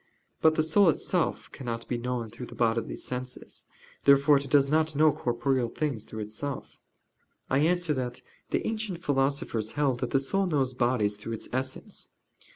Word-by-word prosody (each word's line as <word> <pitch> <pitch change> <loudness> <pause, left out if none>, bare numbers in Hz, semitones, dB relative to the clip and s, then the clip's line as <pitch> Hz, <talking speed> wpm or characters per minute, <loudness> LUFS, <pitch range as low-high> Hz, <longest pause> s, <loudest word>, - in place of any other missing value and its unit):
But 160 0 +5
the 155 - +3
soul 175 +4 +5
itself 155 - 0
cannot 115 -3 -5
be 125 - -1
known 120 -2 -3
through 120 +2 -8
the - - -11
bodily 115 -1 0
senses. 125 0 -5 0.4
Therefore 140 +1 +6
it 140 0 -3
does 140 0 +5
not 155 +1 +1
know 155 +1 +5
corporeal 120 0 0
things 135 -6 -2
through 110 - -7
itself. 110 +7 -6 0.7
I 135 - +4
answer 175 +1 +2
that, 125 -3 -4 0.3
The - - 0
ancient 215 -6 -3
philosophers 135 -6 0
held 140 -4 +1
that - - -2
the 135 - +3
soul 195 +8 0
knows 135 -6 +1
bodies 120 -5 +1
through 115 +2 -6
its 110 - -5
essence. 130 +1 -4
135 Hz, 165 wpm, -28 LUFS, 120-150 Hz, 0.7 s, Therefore